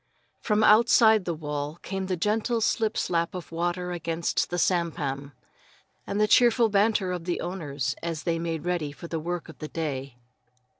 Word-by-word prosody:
From 215 0 +1
outside 220 -1 +6
the 170 - -1
wall 150 0 -4
came 190 -1 -3
the 185 -1 -1
gentle 220 +6 0
slip 220 0 0
slap 170 0 0
of 180 - -7
the 165 - -9
water 175 +1 -1
against 170 -1 -1
the 175 - -2
sampan, 150 -6 -1 0.8
and 200 - -2
the 210 - +4
cheerful 235 0 +5
banter 200 -2 +2
of 175 -2 -4
the 175 - -1
owners 145 -7 -3
as 165 -2 -4
they 165 -2 0
made 165 -1 -3
ready 175 -5 -1
for 170 +4 -10
the 165 -1 -3
work 175 +2 -4
of 160 - -13
the 155 - -5
day. 140 -5 -4
175 Hz, 180 wpm, -26 LUFS, 160-200 Hz, 0.8 s, outside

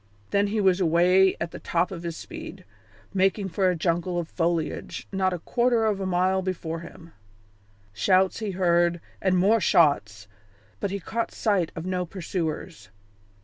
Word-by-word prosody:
Then 200 0 +2
he 215 +2 -1
was 190 -2 +3
away 180 +3 +4
at 170 0 -3
the - - -8
top 175 +2 0
of 175 -3 -6
his 170 -1 -5
speed, 325 -1 -9 0.5
making 195 +1 +1
for 185 +2 +1
a 180 - +1
jungle 175 +1 -1
of 170 -2 -2
foliage 165 -2 -2
not 190 -1 +1
a 180 - -2
quarter 235 +5 +1
of 210 -3 +1
a 190 - -2
mile 185 +1 +1
before 170 -3 -4
him. 170 0 -12 0.8
Shouts 185 - +2
he 215 -2 -3
heard, 175 -2 +2 0.2
and 185 -1 +2
more 205 +5 +4
shots, 110 - +2 0.5
but - - -2
he 200 +1 -3
caught 230 +5 -3
sight 195 -7 0
of 160 - -6
no 185 -1 -1
pursuers. 165 - -5
185 Hz, 165 wpm, -25 LUFS, 170-195 Hz, 0.8 s, away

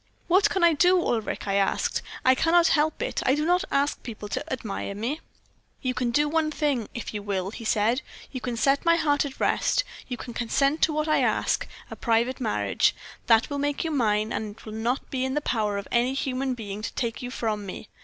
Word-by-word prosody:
"'What 385 +4 +4
can 380 - 0
I 340 -1 +6
do, 360 +4 +4
Ulric?' 225 -10 -2
I 195 - 0
asked. 195 0 +1 0.2
'I 260 - +7
cannot 335 +5 +4
help 315 +9 +2
it - - -2
I 260 - +3
do 300 +1 -1
not 360 +2 +3
ask 280 +1 0
people 215 -3 -7
to - - -2
admire 215 -5 -4
me.' 240 +9 -2 0.6
"'You 255 -1 0
can 250 -1 -1
do 295 +5 +2
one 315 0 +1
thing, 285 -7 -1
if 235 - -5
you 210 - -3
will,' 195 -2 -2
he 230 - -8
said; 225 +4 +2 0.3
'you 255 - -5
can 245 -2 -3
set 275 +4 +2
my 335 0 +5
heart 295 -3 +2
at 270 -2 -7
rest; - - +2 0.2
you 245 - -4
can 240 - -8
consent 275 +6 +1
to - - +4
what 305 +1 -1
I 310 - +3
ask - - +1 0.2
a - - -5
private 235 +2 +1
marriage; 220 -3 +1 0.3
that 230 +5 +4
will 285 - -2
make 290 0 -1
you 325 - -2
mine, 215 -5 +1
and 210 -1 -4
it - - -17
will 215 - -7
not 235 +4 -1
be 260 -1 -1
in 265 +1 -1
the - - +2
power 215 -7 -1
of 200 - -5
any 245 +2 +2
human 265 -1 -1
being 210 -3 -6
to 215 - -4
take 230 -3 -2
you 245 - -4
from 220 -4 -2
me. 200 - -7
255 Hz, 225 wpm, -26 LUFS, 220-295 Hz, 0.6 s, I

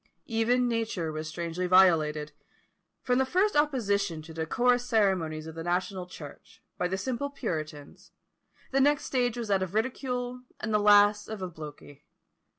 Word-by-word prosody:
Even 240 +2 +1
nature 225 -8 -2
was 155 0 -5
strangely 170 +3 -3
violated! 155 -5 +4 0.7
From 250 0 +2
the - - +4
first 370 +10 +1
opposition 205 - +1
to 160 +1 -11
the 160 0 -3
decorous 245 +5 +2
ceremonies 190 -10 +1
of 160 - -8
the 165 0 -6
national 180 +1 -2
church, 150 -5 -12
by 180 - -1
the 190 +2 -2
simple 255 +7 -3
puritans, 155 - -6 0.6
the 270 0 +2
next 290 +1 +3
stage 245 -2 0
was 230 -3 -4
that 195 -1 +2
of 185 +1 -4
ridicule, 250 +1 -2 0.2
and 215 0 -3
the 210 - +4
last 205 0 +5
of 215 -3 -6
obloquy. 150 -4 -9
200 Hz, 155 wpm, -28 LUFS, 165-245 Hz, 0.7 s, last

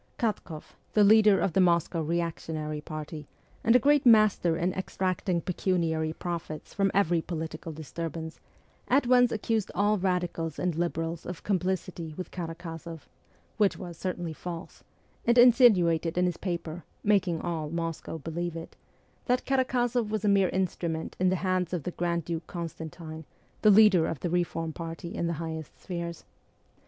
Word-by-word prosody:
Katk6ff, 190 -8 -2 0.3
the 210 - +5
leader 210 -1 +6
of 180 - 0
the 190 - +4
Moscow 170 -1 +2
reactionary 160 -2 -3
party, 155 -1 -7 0.4
and 230 +2 +4
a - - +10
great 290 +3 +4
master 215 - +5
in 180 +2 0
extracting 185 -1 -1
pecuniary 165 -3 0
profits 165 -2 -6
from 195 0 +2
every 175 -4 +2
political 160 -1 -5
disturbance, 160 +1 -6 0.5
at 270 +1 +3
once 245 0 +5
accused 220 -1 -1
all 205 +2 +2
radicals 175 -4 -1
and 180 -1 0
liberals 165 0 -2
of 180 -1 -7
complicity 185 -4 -2
with 185 - -6
Karakozoff 165 -1 -7 0.5
which 205 -3 +3
was 175 -2 -7
certainly 175 -1 -4
false 170 +2 -8 0.4
and 235 +1 +3
insinuated 195 -10 +5
in 180 - +3
his 175 -2 -1
paper 170 -2 -4 0.2
making 190 -5 +2
all 160 -3 -3
Moscow 165 0 -4
believe 165 +2 -4
it 165 0 -8 0.5
that 250 +1 +1
Karakozoff 250 -3 +1
was 215 -1 -2
a - - +3
mere 195 -2 +4
instrument 170 -3 -2
in 185 0 +3
the 185 - +2
hands 185 -1 0
of 170 -5 -2
the 180 - -3
Grand 170 -2 -1
Duke 165 -2 -4
Constantine, 165 -2 -7 0.4
the 215 - +6
leader 200 -5 +6
of 150 -6 -4
the 175 - -2
reform 165 -2 -1
party 165 +1 -6
in 170 - -1
the 170 - -1
highest 160 -1 -6
spheres. 170 -2 -5
175 Hz, 155 wpm, -28 LUFS, 165-195 Hz, 0.5 s, a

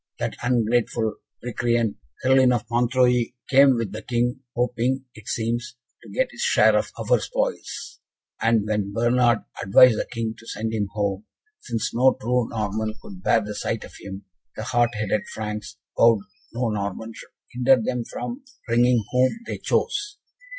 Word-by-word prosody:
That - - -3
ungrateful 120 -2 +1 0.3
recreant, 120 -2 0 0.3
Herluin 130 -1 +5
of 120 - -3
Montreuil, 125 0 +3 0.2
came 135 -1 +6
with 115 -4 -2
the 110 +2 -6
King, 120 +2 -1 0.2
hoping, 125 +2 0
it 110 - -14
seems, 120 +1 -2 0.3
to - - -14
get - - 0
his - - -8
share - - +4
of - - +1
our - - +2
spoils; - - -3 0.4
and 115 -2 +3
when 105 -2 -1
Bernard 120 0 +3 0.2
advised 110 +4 +6
the - - -2
King 115 -2 -2
to 115 - -15
send 110 0 -3
him 105 -2 0
home, 100 -1 -2 0.3
since 115 -3 -3
no 130 +3 +4
true 125 +1 0
Norman 110 0 -2
could 195 -4 -11
bear 115 - +3
the 105 0 -5
sight 105 +2 -3
of - - -12
him, 95 0 -8 0.3
the 110 - -5
hot 120 0 +2
headed 105 -1 0
Franks 105 -1 -5 0.2
vowed 115 -3 +5 0.3
no 120 0 -1
Norman 105 +1 -3
should - - -12 0.2
hinder 125 +1 +4
them 120 +2 -2
from 245 - -6 0.2
bringing 120 0 +3
whom 130 - +2
they - - -5
chose. 415 -2 -1
120 Hz, 160 wpm, -24 LUFS, 110-125 Hz, 0.4 s, came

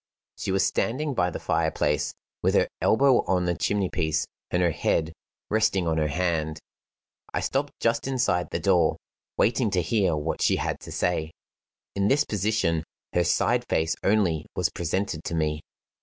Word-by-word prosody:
She - - -3
was 95 0 +2
standing 135 +9 0
by 90 -7 +1
the - - -5
fire - - +1
place, 75 0 -1 0.3
with - - +2
her - - +4
elbow 135 +2 +4
on 90 -2 +1
the 90 - +1
chimney 100 +4 0
piece, 80 -2 0 0.2
and 90 - 0
her 85 - +3
head, 80 +1 0 0.3
resting 105 -5 +1
on 80 -1 +1
her 75 - +1
hand. 80 -1 -1 0.8
I - - +1
stopped 140 +2 -1
just 115 +2 +1
inside 125 -9 0
the - - -2
door, 85 -1 +3 0.4
waiting 115 +1 +2
to 95 -2 +1
hear 95 -2 +1
what 75 +2 -3
she - - +3
had - - -2
to - - -10
say. 85 -3 0 0.7
In 100 0 +1
this 145 +5 +3
position 100 -6 0 0.3
her 90 - +3
side 85 - +2
face 80 0 +1
only 95 -7 +1
was - - +1
presented 85 -1 -2
to 85 - -2
me. 75 -1 0
90 Hz, 170 wpm, -26 LUFS, 80-110 Hz, 0.8 s, her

